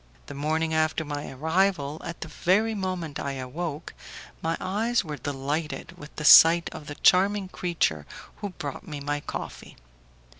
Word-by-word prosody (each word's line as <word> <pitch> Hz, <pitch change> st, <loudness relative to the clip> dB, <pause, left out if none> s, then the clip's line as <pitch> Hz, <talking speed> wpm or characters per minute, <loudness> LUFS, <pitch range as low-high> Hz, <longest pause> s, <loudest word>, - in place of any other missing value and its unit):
The -, -, -9 dB
morning 160 Hz, +3 st, -1 dB
after 160 Hz, 0 st, +1 dB
my 145 Hz, -1 st, -5 dB
arrival, 160 Hz, +1 st, 0 dB
at 170 Hz, -, -7 dB
the -, -, -5 dB
very 195 Hz, +8 st, +1 dB
moment 185 Hz, -7 st, -3 dB
I 140 Hz, -, -3 dB
awoke, 145 Hz, +4 st, -5 dB, 0.5 s
my 165 Hz, +1 st, -1 dB
eyes 225 Hz, +5 st, 0 dB
were 150 Hz, -2 st, -4 dB
delighted 145 Hz, +4 st, -4 dB
with 150 Hz, -3 st, -12 dB
the 150 Hz, -, -5 dB
sight 165 Hz, +3 st, +8 dB
of 150 Hz, -, -9 dB
the 145 Hz, -, -6 dB
charming 195 Hz, +3 st, +3 dB
creature 160 Hz, -, -1 dB, 0.3 s
who 205 Hz, -, -5 dB
brought 150 Hz, 0 st, -7 dB
me 150 Hz, -3 st, -6 dB
my 145 Hz, +1 st, -2 dB
coffee. -, -, -7 dB
160 Hz, 155 wpm, -26 LUFS, 145-180 Hz, 0.5 s, sight